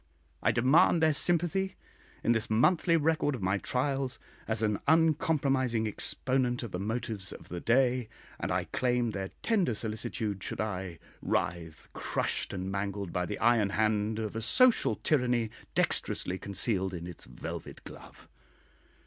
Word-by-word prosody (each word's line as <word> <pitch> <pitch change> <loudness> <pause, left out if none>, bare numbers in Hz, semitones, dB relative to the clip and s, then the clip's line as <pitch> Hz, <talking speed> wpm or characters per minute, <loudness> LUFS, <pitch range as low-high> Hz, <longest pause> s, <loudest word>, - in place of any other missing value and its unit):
I - - +3
demand 135 +6 +4
their 155 -1 +4
sympathy 175 +5 +1 0.5
in - - +2
this 115 -2 +1
monthly 165 - +3
record 155 -2 +1
of 110 - -7
my 95 +2 +1
trials 135 +1 -1 0.3
as 110 0 0
an 105 -2 0
uncompromising 145 -8 +2
exponent 125 +3 +1
of 115 - -6
the 90 - -4
motives 105 -2 -3
of - - -11
the 90 - -5
day, 125 +1 +2 0.3
and - - -3
I - - 0
claim 120 -2 0
their 95 -2 -4
tender 195 - +1
solicitude 105 -2 -3
should - - -5
I 95 -5 -4 0.2
writhe, 80 -2 -3
crushed - - -2
and 95 0 -4
mangled 100 -1 -3
by 90 0 -1
the 105 - -4
iron 110 -3 +3
hand 105 +1 0
of 110 -1 -4
a 115 - -3
social 250 - +4
tyranny 125 -6 0 0.2
dexterously 95 +1 +3
concealed 95 -1 0
in 85 0 -6
its 90 -2 -9
velvet - - -8
glove. - - -13
115 Hz, 150 wpm, -30 LUFS, 100-135 Hz, 0.5 s, demand